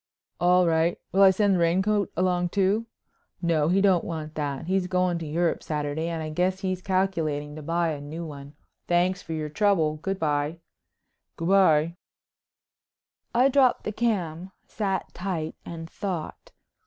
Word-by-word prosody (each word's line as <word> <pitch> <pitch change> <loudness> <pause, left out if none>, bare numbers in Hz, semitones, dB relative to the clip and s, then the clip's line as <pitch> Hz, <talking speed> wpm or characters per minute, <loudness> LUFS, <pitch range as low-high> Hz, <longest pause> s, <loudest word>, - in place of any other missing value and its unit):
"All 180 +1 +4
right. 165 +1 +2
Will 195 - +3
I 195 - +9
send 200 +1 +2
the 180 - +2
raincoat 190 +4 +2
along, 180 -1 +1
too?" 200 +4 +1 0.5
"No, 165 -4 +1
he 185 +4 +3
don't 190 -4 +4
want 155 -2 -5
that. 145 0 -3
He's 185 +1 0
goin' 180 -2 +1
to 165 - -6
Europe 165 +3 0
Saturday 150 +1 -2
and 165 -1 -3
I 155 - -5
guess 185 +4 0
he's 185 -2 -2
calculating 165 -7 -1
to 155 - -7
buy 165 +2 0
a 150 -2 -4
new 160 +4 -6
one. 140 -2 -10 0.3
Thanks 180 +2 +2
for 165 - -6
your 155 -1 -3
trouble. 160 -4 +2
Good 195 +5 -3
bye." 150 -1 -1 0.8
"Good 165 +1 -3
bye." 170 -4 +4 1.4
I 250 +3 +5
dropped 265 -2 +3
the - - -3
cam, 190 -6 -2
sat 195 -3 -3
tight, 175 -4 -3
and 165 -1 -7
thought. 175 -2 -5
175 Hz, 160 wpm, -26 LUFS, 155-190 Hz, 1.4 s, I